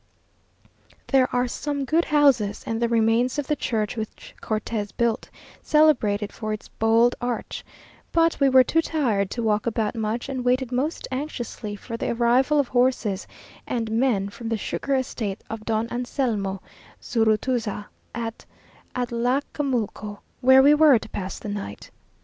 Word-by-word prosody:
There 265 -2 +3
are 250 0 +1
some 285 +2 -3
good 325 +5 +2
houses, 275 -9 +3
and 225 0 -2
the 235 - +2
remains 230 +3 +2
of 290 - -1
the 300 - 0
church 220 -5 -2
which 220 -2 -7
Cortes 215 -1 -3
built, 235 -2 0 0.3
celebrated 225 -10 +3
for 215 -1 -4
its 215 - -7
bold 225 +2 +3
arch; 245 -1 -3 0.5
but 330 0 +2
we 275 -1 +4
were 260 0 +7
too 325 +6 +2
tired 235 -13 0
to 235 - -3
walk 215 0 +1
about 220 -2 0
much, 225 +1 -2
and 260 -2 -3
waited 250 0 +1
most 275 +6 -2
anxiously 245 -6 -4
for 230 +3 -7
the - - -2
arrival 245 +5 +3
of 280 - +1
horses 245 -6 +1 0.4
and 225 -3 -2
men 225 -4 +1
from 225 +2 -7
the 225 - 0
sugar 275 +6 -2
estate 230 -6 -3
of 220 -1 -6
Don 220 0 0
Anselmo 230 -6 -2 0.4
Zurutuza, 225 -1 0 0.3
at 230 -1 -5 0.5
Atlacamulco; 245 -3 -1 0.2
where 260 +1 +7
we 290 +2 +7
were 300 -4 +6
to - - -8
pass 190 -1 -5
the - - -8
night. 200 - -6
235 Hz, 150 wpm, -24 LUFS, 215-260 Hz, 0.5 s, were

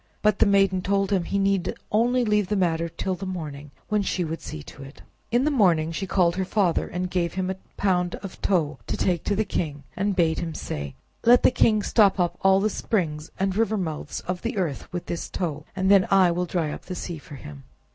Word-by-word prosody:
But 210 -1 +3
the - - +5
maiden 195 -2 +3
told 195 +1 0
him 185 -4 +1
he 200 - -1
need 195 -2 +1 0.2
only 240 +3 +2
leave 210 -2 +2
the 210 - 0
matter 170 -3 +1
till 175 +3 -3
the 190 +1 -5
morning, 150 -5 -6 0.2
when 210 -1 +1
she 190 -2 -1
would 165 +1 -5
see 75 - -7
to 140 - -12
it. 135 +1 -12 0.3
In 240 +2 +2
the 305 - +2
morning 170 - +3
she 195 +4 -4
called 180 -2 +2
her 190 - +1
father, 185 -3 +1
and 180 +1 -3
gave 175 -2 -1
him 185 0 -1
a - - -4 0.2
pound 180 -3 +1
of 195 - -9
tow 160 -6 0
to - - -2
take 175 -3 0
to 205 - +1
the 220 +2 0
king, 145 -7 -3
and 200 +1 0
bade 165 -3 +2
him 165 -2 -4
say: 70 -2 -5 0.3
"Let 240 +1 +6
the - - +6
king 215 -4 +3
stop 205 -3 +4
up 175 -1 0
all 190 0 +5
the 205 - +2
springs 160 -9 -2
and 190 0 0
river 220 0 +1
mouths 160 -6 -4
of 180 -1 -4
the - - -3
earth 165 -8 -3
with 175 -1 -4
this 170 - -4
tow, 165 -6 -3
and 190 0 +2
then 195 -2 +6
will 180 -2 +4
I - - -15
dry 165 -4 0
up - - -8
the 185 - -5
sea 170 -2 -5
for 145 0 -11
him." 75 - -10
185 Hz, 235 wpm, -25 LUFS, 165-200 Hz, 0.3 s, Let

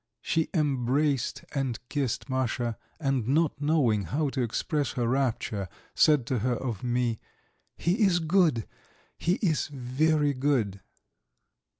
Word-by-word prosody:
She 160 -1 0
embraced 140 -2 +1
and 135 -5 -1
kissed 135 -4 -2
Masha, 125 -3 -1 0.2
and, 135 -6 0
not 150 +1 +1
knowing 135 -10 +2
how 145 - 0
to 135 -1 -2
express 145 - -1
her 120 -2 0
rapture, 115 -7 -1 0.2
said 150 -6 +4
to 125 0 -1
her 125 +3 0
of 120 -4 -4
me: 120 -2 0 0.6
"He 185 +7 0
is 190 -4 +4
good! 160 - +2 0.5
He 175 - +2
is 160 -6 +1
very 145 +2 +1
good!" 130 -8 0
135 Hz, 125 wpm, -28 LUFS, 120-150 Hz, 0.6 s, said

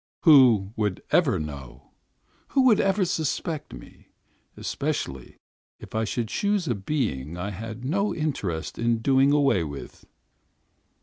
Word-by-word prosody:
Who 125 - +6
would 105 -4 -2
ever 140 - +3
know? 70 -5 -8 0.6
Who 270 - +2
would 240 -5 +5
ever 195 0 +2
suspect 160 -1 -2
me, - - -8
me, - - -12
me, - - -25 0.5
especially 65 -2 -4 0.4
if - - -13
I 110 0 0
should 115 +1 -2
choose 205 -4 0
a 120 - +1
being 95 - -3
I 100 +4 -4
had 110 +5 -7
no 200 +9 0
interest 105 - -3
in 115 -1 0
doing 135 +1 +4
away 140 - +3
with? 70 -3 -9
120 Hz, 140 wpm, -25 LUFS, 95-155 Hz, 0.6 s, Who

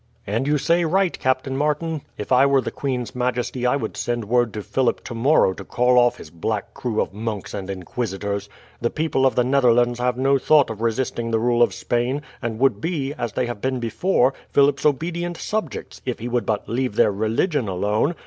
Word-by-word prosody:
"And 115 +7 -1
you 150 0 +3
say 170 +5 +2
right, 185 +2 +2
Captain 130 +1 0
Martin. 150 +2 -1 0.2
If - - -6
I 130 +1 +6
were 140 -1 +4
the - - -4
queen's 130 -3 -3
majesty 125 0 -1
I 125 - +3
would 140 - -3
send 120 -2 -2
word 120 +1 +2
to 105 - -5
Philip 130 +2 0
tomorrow 120 -3 +2
to 100 - -9
call 125 +4 +3
off 120 0 +3
his 75 - -11
black 100 +5 -3
crew 115 -4 -2
of - - -1
monks 105 -1 -4
and 100 -2 -5
inquisitors. 100 +1 -4 0.3
The 120 - +1
people 155 -3 +1
of 130 - -1
the 125 - +3
Netherlands 120 -2 +3
have 125 0 0
no 135 +1 +3
thought 145 -2 +4
of 110 -1 -7
resisting 115 0 -1
the 115 - +1
rule 120 +1 +2
of 120 - +5
Spain, 125 +4 -1 0.2
and 115 -3 -3
would 125 -4 +2
be, 150 -5 -2
as 120 -8 -4
they 125 - 0
have 120 -4 -5
been 130 -1 -1
before, 130 +3 +1 0.2
Philip's 140 +1 +3
obedient 170 +4 -1
subjects, 215 +4 -4
if 125 -2 -3
he 120 - -5
would 120 -4 -1
but 105 -2 -1
leave 125 -1 -1
their - - +4
religion 110 - 0
alone. 105 - 0
125 Hz, 205 wpm, -22 LUFS, 115-140 Hz, 0.3 s, I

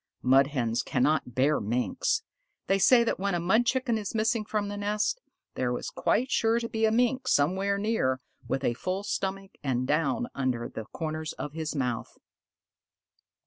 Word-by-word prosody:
Mud 135 +2 +5
Hens 120 -5 -1
cannot 130 -2 0
bear 140 +4 +3
Minks. 125 - 0 0.4
They 195 0 +2
say 235 +5 +6
that 230 - -1
when 200 -1 0
a - - 0
Mud 220 +8 +2
Chicken 245 -3 +1
is 205 +1 -5
missing 220 0 +1
from 210 -1 -2
the 205 - -4
nest, 210 - -1 0.3
there - - -1
is - - -6
quite 260 - 0
sure 225 +1 +3
to 230 - -3
be 225 -1 0
a 220 - +3
Mink 250 +3 +1
somewhere 190 +7 +2
near 200 - 0 0.3
with 135 - -1
a 120 - +2
full 185 +10 -3
stomach 195 -1 -3
and 130 -2 0
down 165 - +1
around 130 -3 -2
the 110 - -5
corners 155 -1 -4
of 150 - -6
his 160 -1 -4
mouth. 125 -4 -2
190 Hz, 175 wpm, -28 LUFS, 135-220 Hz, 0.4 s, say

